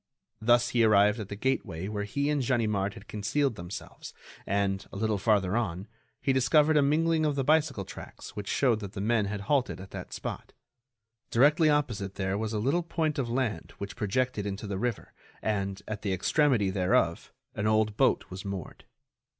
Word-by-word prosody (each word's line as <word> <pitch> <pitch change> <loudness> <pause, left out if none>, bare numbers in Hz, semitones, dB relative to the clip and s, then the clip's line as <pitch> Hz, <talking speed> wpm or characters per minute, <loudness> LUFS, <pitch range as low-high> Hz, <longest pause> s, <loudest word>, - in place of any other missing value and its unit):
Thus 120 +2 +4
he 120 -1 +3
arrived 105 0 +5
at 105 - -6
the 100 - -4
gateway 100 -7 -2
where 105 -1 -3
he 140 +8 -1
and 145 -2 +1
Ganimard 105 -6 0
had - - -12
concealed 130 +6 0
themselves, 85 -1 -8 0.3
and, 100 0 0
a - - -10
little 105 0 0
farther 100 -2 +2
on, 100 -4 -2 0.3
he 135 - +1
discovered 150 +4 +4
a 150 - +6
mingling 160 +3 +2
of 150 -2 +1
the 135 - 0
bicycle 150 -8 +2
tracks - - -10
which 105 -1 -5
showed 120 -5 +2
that 100 -2 -7
the 100 - -6
men 110 +1 +2
had 100 0 -4
halted 130 0 0
at 95 +1 -10
that - - -7
spot. - - -6 0.8
Directly 150 +6 +4
opposite 115 -10 0
there 95 0 -1
was 110 +1 -2
a 110 - -1
little 135 +11 +1
point 160 -3 -1
of 125 -3 -1
land 115 -8 -2
which 100 0 -6
projected 105 0 -1
into 100 +1 -5
the 100 -2 -3
river 120 -1 -3 0.3
and, 100 -2 -2
at 110 -1 -4
the 100 -2 -1
extremity 110 - +2
thereof, 90 -3 +1 0.2
an 105 - -1
old 110 -1 +2
boat - - +2
was 95 +1 -6
moored. 100 -4 -6
110 Hz, 185 wpm, -29 LUFS, 100-135 Hz, 0.8 s, a